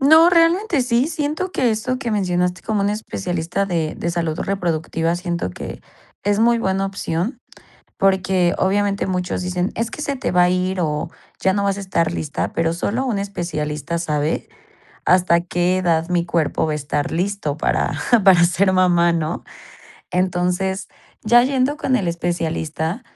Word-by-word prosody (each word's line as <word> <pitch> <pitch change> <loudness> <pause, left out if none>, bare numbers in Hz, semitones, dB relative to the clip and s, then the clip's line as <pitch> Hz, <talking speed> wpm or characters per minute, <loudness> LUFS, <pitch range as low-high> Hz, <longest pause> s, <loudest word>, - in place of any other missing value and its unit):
No, 315 +5 +7
realmente 335 -1 +3
sí, 245 +4 +1
siento 310 +4 -2
que 250 -9 +1
eso 250 +4 -1
que 235 -4 -3
mencionaste 180 -2 0
como 215 -2 -1
un 200 - +1
especialista 175 - -2
de 165 -4 -1
de 170 - -2
salud 165 -2 -2
reproductiva 165 -3 -1
siento 175 - -3
que - - -8 0.4
es 205 0 +2
muy 235 0 +4
buena 195 -2 0
opción. 195 - -3 0.6
Porque, 190 -2 +2
obviamente, 200 +1 +1
muchos 180 -1 -2
dicen: 180 +1 -1
"Es 230 +1 -2
que 300 - -6
se 280 -2 -2
te - - -2
va 180 0 +5
a 180 - +3
ir 185 +1 0
o 150 0 -1 0.3
ya 190 - +3
no 200 - 0
vas 200 0 0
a - - -4
estar 170 -4 0
lista", 155 -3 -3
pero, 165 0 +1
solo 235 +9 -1
un 220 -5 -1
especialista 170 -5 -3
sabe 155 -2 -1 0.6
hasta 175 -2 +4
qué 175 +1 0
edad 170 -2 +1
mi 175 -1 +1
cuerpo 165 -2 0
va - - -1
a - - -1
estar 145 0 -2
listo 175 -4 -2
para - - 0 0.3
para 180 -3 +7
ser 190 +2 +2
mamá, 175 -2 +4
¿no?, 165 0 -2 0.7
entonces, 180 +2 0 0.4
ya 240 +3 +6
yendo 265 +2 +1
con 265 -5 +1
el 190 - -1
especialista, 165 +2 -2
180 Hz, 165 wpm, -20 LUFS, 170-205 Hz, 0.7 s, No